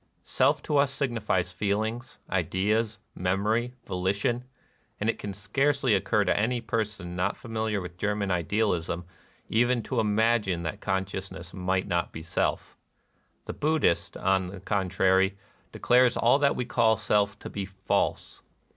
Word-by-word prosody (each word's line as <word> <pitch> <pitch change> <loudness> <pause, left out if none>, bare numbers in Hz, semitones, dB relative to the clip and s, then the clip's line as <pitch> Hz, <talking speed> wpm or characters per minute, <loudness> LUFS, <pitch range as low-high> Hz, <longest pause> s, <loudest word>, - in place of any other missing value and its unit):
Self - - +2
to 150 - 0
us 140 -1 +3
signifies 110 -10 -1
feelings, 110 +6 -2
ideas, 105 +5 0 0.2
memory, 105 +7 0
volition; 100 +7 -1 0.5
and 110 +2 +2
it - - -15
can 100 - -5
scarcely 130 +6 +1
occur 105 +2 +2
to - - +2
any 120 +4 +1
person 105 -5 -3
not 90 +2 0
familiar 110 -3 -2
with 90 0 -9
German 105 -1 0
idealism 90 -1 0 0.4
even 120 +1 +2
to 125 +1 -2
imagine 105 -4 +2
that 80 - -4
consciousness 95 -2 -3
might 95 0 0
not 85 -2 0
be 80 - -8
Self. 85 - -2 0.7
The - - -5
Buddhist, 155 - +1
on 95 -1 +1
the 95 +1 -8
con 95 0 -1
trary, 95 +1 +3 0.4
declares 125 0 +3
all 120 +4 +4
that 140 -1 +3
we 125 - -2
call 110 -2 +3
Self 105 0 +1
to - - -9
be 100 -1 -3
false. 95 0 -2
105 Hz, 145 wpm, -27 LUFS, 95-115 Hz, 0.7 s, all